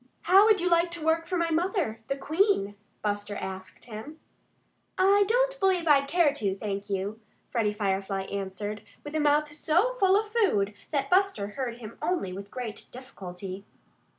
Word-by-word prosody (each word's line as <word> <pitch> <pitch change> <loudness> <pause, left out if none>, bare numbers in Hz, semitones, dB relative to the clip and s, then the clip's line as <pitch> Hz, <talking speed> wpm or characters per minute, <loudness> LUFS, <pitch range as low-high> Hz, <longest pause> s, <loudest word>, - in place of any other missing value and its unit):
"How 385 +4 +7
would 430 -2 +5
you 355 - 0
like 340 0 +3
to 315 - -6
work 325 +1 +2
for 365 - -1
my 335 -1 0
mother, 330 - 0
the 275 - -2
Queen?" 315 - +1 0.3
Buster 205 0 -2
asked 190 -1 -7
him. 235 +8 -9 0.8
"I 400 +2 +5
don't - - +2
believe 370 -3 +2
I'd 280 -2 +5
care 335 -3 +3
to, 200 -9 -1
thank 200 0 -4
you," 200 +2 -2 0.3
Freddie 225 -4 +1
Firefly 195 -2 -1
answered, 200 +2 -5 0.2
with 295 - -8
a 315 - 0
mouth 295 0 +2
so 340 +11 +2
full 390 0 +5
of 430 0 -5
food 210 - +2 0.2
that 275 -2 -1
Buster 375 - +2
heard 240 +1 -4
him 230 -2 -10
only 340 - -1
with 200 +2 -8
great 235 -4 -6
difficulty. 195 -6 -8
275 Hz, 170 wpm, -28 LUFS, -, 0.8 s, How